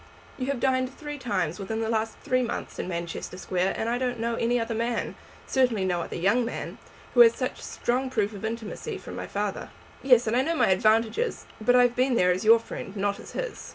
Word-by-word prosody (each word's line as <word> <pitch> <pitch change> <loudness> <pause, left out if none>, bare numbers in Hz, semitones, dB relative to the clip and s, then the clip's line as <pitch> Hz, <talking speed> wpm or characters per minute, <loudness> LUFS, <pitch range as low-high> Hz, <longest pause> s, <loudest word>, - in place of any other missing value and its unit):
"You 255 - -2
have 280 -3 -1
dined 260 0 +1
three 295 -1 -6
times 185 -9 -1
within 220 +3 -3
the 225 - -1
last 225 0 -1
three 255 0 +2
months 240 - -4
in - - -3
Manchester 170 0 -5
Square, 185 0 -1
and 220 - -2
I 240 +1 0
don't 250 -1 -1
know 230 +1 -1
any 235 +1 +1
other 230 0 -2
man, 230 +1 -1 0.3
certainly 245 -7 +2
no 175 -2 0
other - - -5
young 200 +8 +2
man, 235 - -5 0.3
who - - +2
has 470 -1 +9
had - - -3
such - - -13
strong 255 +2 -1
proof 215 -4 0
of 200 - -9
intimacy 220 -1 -4
from - - -9
my - - -5
father." - - -3 0.3
"Yes, 250 -3 +5
and 220 +1 0
I 255 - +4
know 330 +5 0
my - - +3
advantages. 220 - +2 0.2
But 245 +3 +4
I 250 - +7
have 245 -1 +2
been 255 0 +2
there 180 -5 +4
as 185 +3 -1
your 225 +1 +8
friend, 215 -2 -7
not 200 0 0
as - - -11
his." - - -5
230 Hz, 230 wpm, -26 LUFS, 205-255 Hz, 0.3 s, has